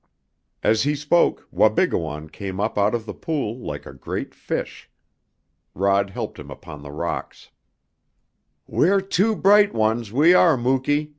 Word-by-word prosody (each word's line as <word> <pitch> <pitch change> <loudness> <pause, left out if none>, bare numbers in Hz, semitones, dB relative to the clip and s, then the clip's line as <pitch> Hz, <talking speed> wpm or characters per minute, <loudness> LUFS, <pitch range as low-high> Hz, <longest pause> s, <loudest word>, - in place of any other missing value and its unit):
As 110 +1 +3
he 145 +2 +1
spoke 150 +4 +1
Wabigoon 75 -1 +1
came 95 +1 -6
up 105 - -1
out 105 +3 +2
of 115 -2 -4
the - - -6
pool 130 -7 -3
like - - -6
a 65 - -10
great 65 - -6
fish. - - -5 0.9
Rod 100 +1 +2
helped 95 - -6
him - - -10
upon 80 -4 -10
the 70 - -10
rocks. 80 +4 -5 1.1
"We're 195 +3 +2
two 195 +3 +1
bright 205 - +4
ones, 110 0 0
we 150 +9 +5
are, 170 -5 +5
Muky!" 135 +4 0
120 Hz, 145 wpm, -22 LUFS, 100-155 Hz, 1.1 s, we